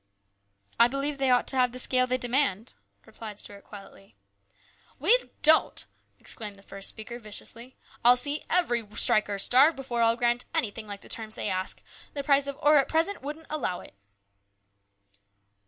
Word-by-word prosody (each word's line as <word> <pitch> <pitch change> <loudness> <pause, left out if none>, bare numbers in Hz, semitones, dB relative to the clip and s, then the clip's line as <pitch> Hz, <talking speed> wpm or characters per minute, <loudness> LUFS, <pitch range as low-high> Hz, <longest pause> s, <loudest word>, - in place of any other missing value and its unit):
" - - -47 0.3
I 235 - +7
believe 275 +2 -3
they 270 -1 +1
ought 250 -1 +3
to - - +3
have 250 -1 +2
the - - -7
scale 255 0 +1
they 255 0 0
demand," 245 -4 -1 0.3
replied 215 -3 -9
Stuart 200 -1 -7
quietly. 195 0 -14 0.4
" - - -32
We 475 - +5 0.3
don't 315 +1 +4 0.2
!" - - -43
exclaimed 210 -3 -5
the 195 - -18
first 195 0 -5
speaker 235 +2 -9
viciously. 230 +3 -7
" - - -26
I'll 245 +1 +6
see 285 +4 -1
every 245 -10 +1
striker 210 -1 +3
starve 270 +10 +4
before 255 -3 -3
I'll 230 0 +3
grant 240 0 0
anything 215 0 -2
like 205 -1 -8
the - - -15
terms 220 -1 -2
they - - -2
ask. 185 0 -3 0.3
The 280 - -3
price 280 0 +2
of 280 -1 -5
ore 300 +1 +6
at 275 - +3
present 330 +6 -1
wouldn't 300 +4 -7
allow 260 -12 -3
it." - - -15
245 Hz, 180 wpm, -27 LUFS, 215-275 Hz, 0.4 s, I